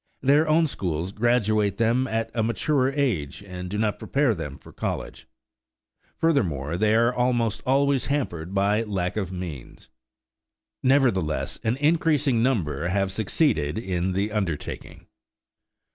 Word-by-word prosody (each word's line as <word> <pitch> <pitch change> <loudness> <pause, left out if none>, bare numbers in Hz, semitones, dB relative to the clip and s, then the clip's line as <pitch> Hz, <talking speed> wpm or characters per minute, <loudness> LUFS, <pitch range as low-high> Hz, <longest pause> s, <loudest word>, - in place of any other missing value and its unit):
Their 145 +4 +4
own 160 +2 +4
schools 90 - -3
graduate 110 -3 +1
them 120 +3 +2
at 115 -2 -2
a 115 - 0
mature 130 +4 +1
age 110 - -1
and 90 -2 -7
do 105 - -3
not 105 -1 0
prepare 140 -4 +1
them 75 -7 -6
for - - -16
college. - - -5 0.9
Furthermore, 85 - 0
they 105 +4 +2
are 115 +2 +3
almost 120 -4 0
always 140 0 +2
hampered 95 - -2
by 100 +3 +2
lack 95 -5 -2
of 95 -4 -2
means. 85 -12 -8 0.9
Nevertheless, 120 - +1
an 115 +1 +1
increasing 150 -4 +2
number 85 - 0
have 95 +1 0
succeeded 95 - 0
in 95 -3 -1
the 100 +3 -1
undertaking. 95 -8 -4
110 Hz, 130 wpm, -25 LUFS, 90-130 Hz, 0.9 s, Their